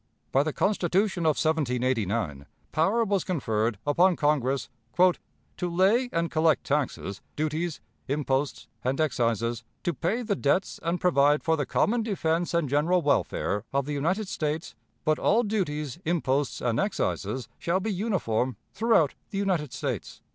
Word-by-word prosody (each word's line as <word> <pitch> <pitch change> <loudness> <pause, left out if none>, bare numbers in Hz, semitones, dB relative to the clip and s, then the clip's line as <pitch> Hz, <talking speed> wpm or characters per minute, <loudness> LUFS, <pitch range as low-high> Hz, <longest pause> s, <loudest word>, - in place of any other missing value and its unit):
By 135 - +4
the 155 +2 -1
Constitution 190 0 +1
of 155 - +3
1789 120 - 0 0.2
power 195 +9 +2
was 200 -4 +1
conferred 115 - 0
upon 175 +5 +4
Congress 140 -4 +1 0.3
"To 180 0 +3 0.4
lay 200 +9 +3
and 170 0 -1
collect 160 -1 +3
taxes, 135 -8 -2
duties, 155 +2 -2 0.3
imposts, 140 0 -1 0.2
and 130 +3 0
excises, 115 -5 0 0.2
to 175 - 0
pay 215 +11 -1
the 210 -3 0
debts 180 +4 0
and 170 +2 -1
provide 145 -4 +3
for 160 - +2
the 145 -4 -2
common 235 +2 +2
defense 175 -6 0
and 170 -3 +2
general 160 +6 +2
welfare 120 -7 0
of 140 -1 0
the 150 - -3
United 185 +9 0
States; 155 -1 -3 0.3
but 155 0 +2
all 230 +4 +3
duties, 165 - -2
imposts, 145 -5 0
and 120 -2 0
excises 130 - -1
shall 170 +2 +1
be 210 +2 -2
uniform 130 - -1 0.2
throughout 220 -10 +3 0.2
the 195 - -5
United 180 -9 0
States." - - -4
155 Hz, 145 wpm, -27 LUFS, 135-185 Hz, 0.4 s, By